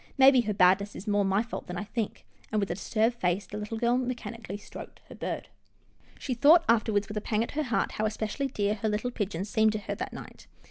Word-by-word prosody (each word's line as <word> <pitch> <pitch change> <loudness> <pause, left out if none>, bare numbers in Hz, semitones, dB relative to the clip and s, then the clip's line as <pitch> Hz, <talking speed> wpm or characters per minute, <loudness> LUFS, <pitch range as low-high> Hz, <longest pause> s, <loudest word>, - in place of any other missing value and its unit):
Maybe 265 -1 +7
her 215 -2 -2
badness 195 +2 +4
is 195 - -8
more 205 -1 +2
my 195 +2 +2
fault 235 - -7
than 180 -1 -5
I 210 - -3
think," 220 0 -4 0.3
and, 215 - +1
with 200 -3 -1
a - - +1
disturbed 220 +5 0
face, 185 0 0
the 200 - -9
little 210 +2 -4
girl 240 +2 +2
mechanically 235 -5 -5
stroked 205 - -11
her - - -9
bird. - - -4 0.7
She 260 - -3
thought 305 +7 +6
afterwards, 215 -3 +2
with 210 - -5
a - - -1
pang 215 +1 0
at - - -6
her 310 - -1
heart, 250 -6 0
how 215 0 0
especially 220 +5 -2
dear 205 -5 0
her 215 +1 -2
little 215 +4 -1
pigeon 200 -5 -3
seemed 220 +1 +2
to 215 - -2
her - - -4
that - - -5
night. - - -11
215 Hz, 235 wpm, -28 LUFS, 205-235 Hz, 0.7 s, Maybe